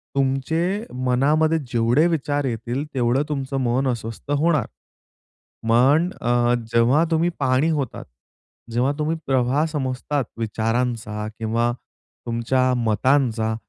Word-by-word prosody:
तुमच्या 160 - -1
मनामध्ये 150 +6 +2
जेवढे 120 +6 +2
विचार 145 -3 -1
येतील 120 +3 -3
तेवढं 125 +2 +1
तुमचं 135 -1 -3
मन 130 +2 +1
अस्वस्थ 115 +2 -4
होणार. 155 -5 +2 1.0
पण 140 +9 +4
अ, 120 0 +2 0.2
जेव्हा 125 +8 +4
तुम्ही 165 +2 +2
पाणी 130 +5 +2
होतात. 140 -6 -3 0.7
जेव्हा 125 +4 +1
तुम्ही 155 +2 0
प्रवाह 130 +2 +2
समजतात 140 -2 -2
विचारांचा 115 -1 -2
किंवा 115 +2 0 0.5
तुमच्या 125 +2 +1
मतांचा, 115 -1 +1
130 Hz, 105 wpm, -22 LUFS, 120-145 Hz, 1.0 s, पण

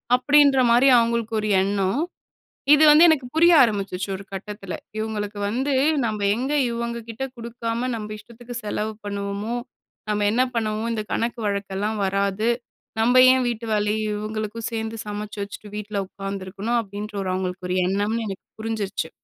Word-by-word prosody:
அப்படீன்ற 285 +1 +5
மாரி 245 +3 +5
அவங்களுக்கு 230 -1 0
ஒரு 215 - -2
எண்ணம். 195 +6 0 0.7
இது 310 +1 +5
வந்து 310 +3 +8
எனக்கு 285 -6 +2
புரிய 340 +2 +6
ஆரம்பிச்சுருச்சு 200 -4 -1
ஒரு 195 - -10
கட்டத்தில. 195 -1 -6 0.2
இவங்களுக்கு 210 -1 -3
வந்து, 265 +6 0 0.3
நம்ம 215 -2 -3 0.2
எங்க 260 +4 -2 0.2
இவங்க 235 0 -3
கிட்ட 230 +4 -4
குடுக்காம, 235 +1 -3
நம்ப 215 -1 -6
இஷ்டத்துக்கு 235 +3 -11
செலவு 215 +1 -2
பண்ணுவோமோ 200 +2 -3 0.6
"நம்ம 210 0 +1
என்ன 250 +2 +3
பண்ணுவோம்? 220 0 -1
இந்த 215 - -2
கணக்கு 235 +1 -1
வழக்கெல்லாம் 200 +1 -2
வராது. 200 +3 0 0.5
நம்ப 245 +3 +3 0.2
ஏன் 260 -1 +2
வீட்டு 235 -1 -3
வேலையும் 210 +1 0
இவங்களுக்கும் 215 +1 -4
சேர்ந்து 225 0 -3
சமைச்சு 210 0 -5
வச்சுட்டு, 205 +1 -8
வீட்ல 210 0 -5
உட்காந்துருக்கணும்." 195 +4 -3
அப்படீன்ற 205 0 -7
ஒரு 185 - -2
அவங்களுக்கு 185 -1 -3
ஒரு 185 - +1
எண்ணம்ன்னு 205 +4 0
எனக்கு 195 -1 -7 0.2
புரிஞ்சுருச்சு. 215 -7 -3
215 Hz, 145 wpm, -23 LUFS, 200-235 Hz, 0.7 s, வந்து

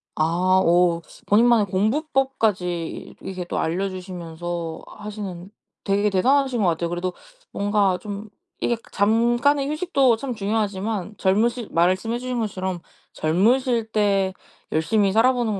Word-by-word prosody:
아 175 +4 +2
어 170 0 +3 0.3
본인만의 225 0 +4
공부법까지 215 - -1
이렇게 185 -2 -5
또 - - -3
알려주시면서 175 -2 -4
하시는 200 -4 -7 0.3
되게 205 +1 +2
대단하신 255 +5 +2
거 195 - +3
같아요. 170 0 -1
그래도 175 +1 -3 0.4
뭔가 200 -2 +1
좀 205 0 -7 0.3
이게 240 - +1 0.2
잠깐의 240 +7 +2
휴식도 295 -6 +2
참 260 +1 -4
중요하지만 210 -1 -2
젊으실 225 +4 +1
말씀해 185 +7 +1
주신 250 0 -3
것처럼 190 -4 -3 0.3
젊으실 225 +8 +1
때 200 -3 +2 0.4
열심히 195 +5 +2
살아 225 +5 +5
보는 225 -5 -1
205 Hz, 290 characters per minute, -23 LUFS, 180-235 Hz, 0.4 s, 살아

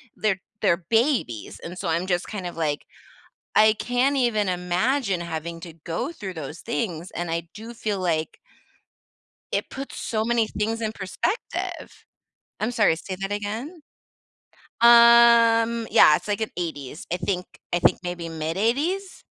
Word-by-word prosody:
they're 195 -3 0 0.2
they're 190 -5 +3
babies, 225 - 0
and 175 +2 -8
so 180 - -4
I'm 170 +3 0
just 175 -1 0
kind 195 -4 -5
of 175 - -7
like, 150 -3 -1 0.7
I 215 0 +6
can't 250 +5 0
even 215 -6 +1
imagine 185 +4 0
having 170 0 -5
to 165 -1 -9
go 175 - -2
through 200 - -7
those 150 0 -7
things, 185 -7 -3
and 175 -1 -4
I 170 0 -2
do 225 +3 -9
feel 210 -3 -3
like 160 -3 -1 1.2
it - - -1
puts 275 0 -7
so 220 -1 -2
many 235 -1 +2
things 225 +2 -2
in 220 - -1
perspective. 220 - -4 0.6
I'm 220 +3 0
sorry, 210 -8 +3
say 185 +2 -7
that 195 +1 -2
again? 225 - -5 1.0
Um, 235 -1 +6
yeah, 150 - +7
it's - - -11
like 205 +1 -1
an 220 - -2
80s 155 -4 -5
I 180 - +1
think 180 +1 -2 0.3
I 175 - +3
think - - +3
maybe 175 -1 -4
mid 160 +1 -4
80s? 315 - -1
205 Hz, 155 wpm, -24 LUFS, 175-235 Hz, 1.2 s, yeah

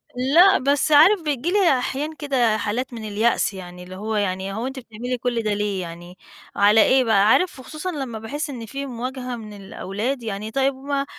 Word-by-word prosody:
لأ، 330 +10 +5
بس 280 +3 +1
عارف، 335 +6 +6
بييجي 300 +2 -1
لي 360 -10 +3
أحيانًا 295 +5 -3
كده 250 -7 +1
حالات 240 +5 -3
من 225 -2 -7
اليأس 215 0 +1
يعني 180 -1 -9
اللي 185 +1 -10
هو 215 +3 -4
يعني 195 -1 -1
هو 225 +4 -3
أنتِ 265 0 -6
بتعملي 240 +2 -5
كل 240 -1 -2
ده 210 -1 0
ليه 205 -2 -2
يعني، 175 +1 -9 0.4
على 210 +2 +5
إيه 260 0 +4
بقى، 210 -3 +3
عارف 360 +6 +2
وخصوصًا 310 +7 -6
لمَّا 265 -8 -5
باحس 290 +8 -5
إن 245 -5 -6
في 275 +5 -5
مواجهة 255 0 -5
من 215 -3 -9
الأولاد، 205 +5 -4
يعني 215 0 -5
طيِّب 270 +2 +1
ما 275 +1 -2
245 Hz, 195 wpm, -22 LUFS, 210-275 Hz, 0.4 s, عارف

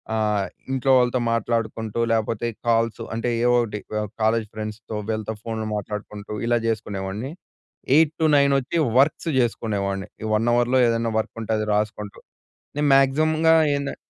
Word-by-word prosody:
ఆహ్, 105 -2 +1 0.3
ఇంట్లో 135 0 +1
వాళ్ళతో 125 0 +2
మాట్లాడుకుంటూ 115 -1 -2
లేపోతే 115 +1 0 0.2
కాల్సు 115 0 +1
అంటే 115 +2 -1 0.2
ఏవో 120 0 +4
ఒకటి 105 -3 -4
వ 105 - 0 0.2
కాలేజ్ 110 0 +2
ఫ్రెండ్స్‌తో 110 0 -6
వీళ్ళతో 110 0 -2
ఫోన్‌లు 110 -1 -4
మాట్లాడుకుంటూ 105 0 -6
ఇలా 120 0 +2
జేసుకునేవాడిని. 105 +1 -3 0.6
8-9 150 -2 +4
వచ్చి 135 +6 -3 0.2
వర్క్స్ 150 +4 +2
చేసుకునేవాడిని. 100 -5 -1 0.2
ఈ - - -3
1 110 +2 0
అవర్‌లో 120 +2 +3
ఏదైనా 115 0 0
వర్క్ 110 - -4
ఉంటే 110 0 -2
అది 110 0 -2
రాసుకుంటూ 105 -1 -3 0.6
నేను 145 0 +1
మాక్సిమమ్‌గా 155 +4 +3 0.2
ఏందన్ 140 0 -3
115 Hz, 135 wpm, -23 LUFS, 105-130 Hz, 0.6 s, ఏవో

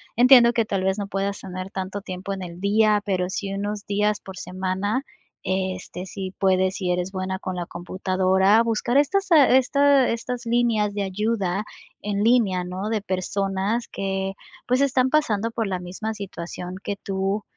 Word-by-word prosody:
Entiendo 245 0 +7
que 230 -2 +1
tal 195 -3 -1
vez 190 +1 +1
no 205 - -2
puedas 195 0 -2
tener 185 0 -6
tanto 195 +1 -5
tiempo 190 0 -5
en 195 - -6
el 175 -1 -8
día, 210 +2 +3
pero 185 -3 0
sí 195 0 -3
unos 205 +1 -4
días 210 +1 +1
por 190 - -10
semana, 185 +7 -2 0.4
este, 185 -1 -3
si 190 0 -5
puedes 190 0 +2
y 180 -1 0
eres 180 +1 -1
buena 190 0 -3
con 185 0 -4
la 175 -1 -3
computadora, 190 +4 +2
buscar 230 +2 0
estas, 385 +7 +2
eh, 280 -5 +7
esta 280 0 +4
estas 240 +1 -3
líneas 230 -3 +1
de 205 0 -1
ayuda, 200 -1 -1 0.4
en 205 0 -1
línea, 215 -6 +3
¿no? 185 +3 -4
De 220 -2 0
personas 195 +3 -1
que 195 0 -3 0.3
pues 250 +2 +2
están 260 -2 +3
pasando 230 -7 +1
por 225 -2 -2
la 185 -2 -2
misma 190 +5 -5
situación 180 -2 -7
que 200 - -2
tú. 195 +1 -2
200 Hz, 170 wpm, -24 LUFS, 185-225 Hz, 0.4 s, Entiendo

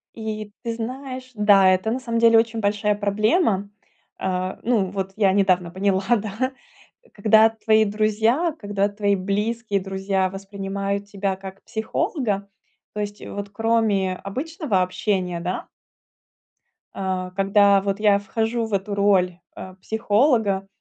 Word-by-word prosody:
И, 215 -2 -5
ты 230 -1 -2
знаешь, 255 +2 -6
да, 205 -2 +5
это 185 +4 +1
на 250 - -1
самом 235 -2 -2
деле 230 0 +6
очень 225 0 -1
большая 210 0 +1
проблема. 205 - +1 0.5
Э, 185 0 -2
ну, 230 -5 +2
вот, 195 -1 -4
я 200 -3 +3
недавно 185 -3 +2
поняла, 190 +1 0
да, 220 +5 -3 0.6
когда 220 +2 +5
твои 220 -1 +2
друзья, 220 +10 +1
когда 205 -1 0
твои 205 0 0
близкие 205 +2 -1
друзья 190 0 -1
воспринимают 195 +1 -4
тебя 200 -1 -2
как 190 0 -10
психолога. 220 - -2 0.4
То 210 - -3
есть, 205 0 -6
вот 200 0 -6
кроме 205 -3 +1
обычного 265 - -2
общения, 185 -1 -1
да 180 +2 -4 1.3
А, 185 -1 -3
когда 200 +1 +4
вот 195 +1 -2
я 205 -2 +4
вхожу 225 +3 -1
в 220 - -7
эту 200 +1 -1
роль, 190 -3 +2 0.2
э, 185 0 -9
психолога, 220 -3 +1
205 Hz, 135 wpm, -23 LUFS, 195-225 Hz, 1.3 s, деле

